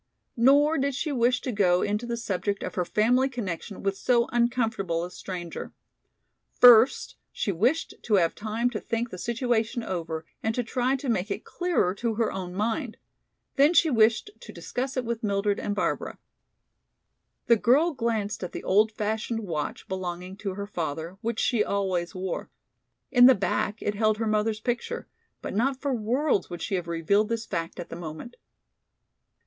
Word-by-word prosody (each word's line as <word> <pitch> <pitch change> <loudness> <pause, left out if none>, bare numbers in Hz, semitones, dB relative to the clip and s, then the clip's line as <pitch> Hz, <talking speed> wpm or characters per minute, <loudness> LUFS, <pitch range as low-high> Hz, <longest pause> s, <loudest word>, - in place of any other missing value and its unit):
Nor 285 +6 +4
did 275 0 0
she 300 - -2
wish 250 -1 +2
to 255 - -3
go 180 -5 +3
into 210 +3 -1
the 235 0 -2
subject 200 -2 -2
of - - -4
her 180 - 0
family 250 +7 +2
connection 200 -5 -5
with 195 0 0
so 235 +3 +2
uncomfortable 225 -8 0
a 180 - -6
stranger. 180 -2 -7 0.9
First 245 +1 +6
she 200 - -2
wished 240 - +1
to 215 - +1
have 170 -4 +3
time 225 +3 -1
to 215 - -3
think 230 +3 -3
the 185 - -7
situation 235 0 -1
over 165 -4 -4 0.2
and 220 0 -1
to 245 - 0
try 250 +3 0
to 275 +1 -5
make 210 -4 0
it 200 - -4
clearer 350 - 0
to 225 +2 -2
her 225 0 0
own 180 -1 -5
mind. 225 +4 -2 0.6
Then 290 +5 +5
she 325 -2 +5
wished 225 - +3
to - - -11
discuss 260 +2 -4
it 255 - -1
with 230 0 -3
Mildred 200 -1 0
and 205 - -2
Barbara. 210 - -2 1.3
The 235 - +6
girl 290 +10 +3
glanced 220 -5 -2
at 180 - -5
the - - -6
old 210 +3 +3
fashioned 220 +2 -2
watch 165 -8 -4
belonging 185 0 -5
to 195 -3 -4
her 200 0 -4
father, 165 -1 -4
which 230 -1 -2
she 230 -4 +2
always 190 -4 -1
wore. 185 -1 -4 0.6
In 245 -1 +8
the 260 - +7
back 200 +2 -1
it 205 - 0
held 215 +1 +2
her 225 - -1
mother's 215 0 0
picture, 245 - -3 0.4
but - - -4
not 260 +6 +1
for 280 -1 -1
worlds 245 0 0
would 175 -1 -6
she 205 - -3
have 180 -2 -1
revealed 185 +6 +1
this 230 -1 -2
fact 170 -3 -4
at 175 - -6
the - - -6
moment. 165 +7 -8
215 Hz, 175 wpm, -26 LUFS, 190-245 Hz, 1.3 s, In